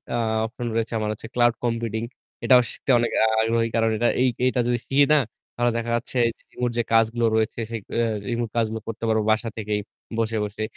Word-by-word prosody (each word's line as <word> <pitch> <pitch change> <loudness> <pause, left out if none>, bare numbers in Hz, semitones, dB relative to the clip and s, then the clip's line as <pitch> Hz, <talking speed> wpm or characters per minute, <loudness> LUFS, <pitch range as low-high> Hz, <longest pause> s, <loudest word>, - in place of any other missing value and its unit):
আ - - +1 0.3
option 120 +1 -5
রয়েছে 115 0 -1
আমার 105 -1 -1
হচ্ছে 110 - -9
ক্লাউড 120 -1 +3
কম্পিউটিং 115 -1 -1 0.4
এটাও 125 -1 +7
শিখতে - - -2
অনেক 120 - 0 0.3
আগ্রহী, 115 +1 +1
কারণ 115 -1 +3 0.3
এই 130 - +4 0.2
এটা 125 - -2
যদি 120 - +2
শিখি 140 +1 +4
না? 150 - +6 0.4
তাহলে 120 0 +2
দেখা 115 0 -2
যাচ্ছে 120 +2 -4 0.3
রিমোট 125 -1 -2
যে 120 - +2
কাজগুলো 115 +1 +3
রয়েছে, 110 +1 0
সে 115 - -4 0.2
অ - - +4 0.3
রিমোট 120 -1 -1
কাজগুলো 110 -1 0
করতে 115 0 -6
পারবো 110 -1 +2
বাসা 115 +1 +1
থেকেই 105 -1 -1 0.4
বসে, 115 0 0
বসে। 105 +1 -5
115 Hz, 190 wpm, -24 LUFS, 110-120 Hz, 0.4 s, এটাও